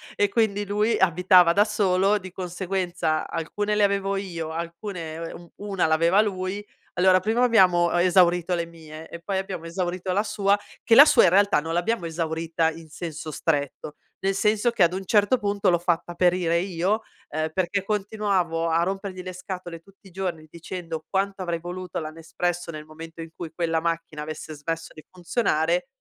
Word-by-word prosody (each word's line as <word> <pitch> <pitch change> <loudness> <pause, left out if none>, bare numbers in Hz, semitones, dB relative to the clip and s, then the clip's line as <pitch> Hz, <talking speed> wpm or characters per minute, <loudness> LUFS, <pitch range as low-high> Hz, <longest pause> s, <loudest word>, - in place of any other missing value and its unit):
E 205 - +2
quindi 205 -1 +1
lui 210 +3 +1
abitava 180 0 +5
da 205 +4 +4
solo, 200 -1 +2
di 185 -2 -9
conseguenza 180 -3 -2
alcune 205 +6 -2
le 210 - +3
avevo 200 0 +1
io, 170 -5 -4
alcune 170 -1 -6
u 170 -1 -12
1 200 -4 -1
l'aveva 165 +5 +4
lui, 195 0 -3 0.3
allora 185 +1 +4
prima 220 +6 +1
abbiamo 180 -8 +4
esaurito 180 0 +3
le 170 - -2
mie 160 -1 -12
e 170 - -8
poi 190 +2 -2
abbiamo 190 -3 -4
esaurito 180 +1 -3
la 205 +2 +2
sua. 200 -1 +1 0.2
Che 230 - +4
la 280 - +12
sua - - +5
in 185 - +6
realtà 200 -1 +4
non 165 +2 -4
l'abbiamo 175 +2 0
esaurita 165 0 -1
in 160 0 -11
senso 155 0 -6
stretto. 145 -1 -2 0.3
Nel 195 0 +1
senso 210 +4 +2
che 235 -6 +3
ad 170 +1 +3
un 190 +1 -3
certo 205 +5 +3
punto 200 -3 0
l'ho 175 - +3
fatta 175 0 -1
perire 175 -1 +2
io, 190 +4 0 0.3
ehm, 155 +1 -2
perché 185 +2 -1
continuavo 195 -5 -1
a 165 +1 +2
rompergli 195 0 -4
le 185 0 -7
scatole 180 -2 -7
tutti 195 +3 -21
i - - -16
giorni 175 -4 -4
dicendo 165 -1 -6
quanto 195 0 -1
avrei 170 -2 -2
voluto 180 0 -5
la 155 -1 -5
Nespresso 165 +2 -3
nel 155 -1 -8
momento 165 +1 -11
in 165 0 -9
cui 165 -3 -7
quella 165 -1 0
macchina 165 -2 -3
avesse 155 +1 -6
smesso 165 +2 -5
di 155 - -13
funzionare 175 - 0
180 Hz, 180 wpm, -25 LUFS, 165-195 Hz, 0.3 s, la